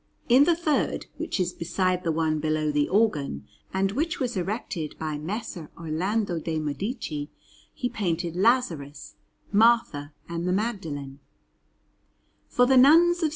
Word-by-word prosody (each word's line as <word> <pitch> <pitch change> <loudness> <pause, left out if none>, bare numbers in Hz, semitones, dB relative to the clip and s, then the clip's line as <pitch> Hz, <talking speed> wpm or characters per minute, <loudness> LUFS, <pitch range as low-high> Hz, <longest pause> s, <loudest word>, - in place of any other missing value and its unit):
In 255 +4 +6
the 340 - +4
third, 320 -3 0
which - - -3
is 180 -1 0
beside 180 +2 -1
the 165 - +1
one 155 -1 0
below 155 0 0
the 145 0 +1
organ, 150 - +1 0.2
and 190 0 0
which 320 - -1
was 250 -4 -2
erected 180 -4 -3
by 155 -2 -3
Messer 180 -1 -5
Orlando 175 +4 -1
de' 160 0 -3
Medici, 155 - -3 0.4
he 250 - -3
painted 175 -6 -2
Lazarus, 175 - 0 0.4
Martha, 210 -9 +3 0.2
and 170 +1 -3
the 180 - +1
Magdalene. 160 - -3 1.3
For 245 - +4
the 265 +1 +4
Nuns 335 +7 +6
of - - +2
S. - - -2
180 Hz, 145 wpm, -26 LUFS, 155-230 Hz, 1.3 s, In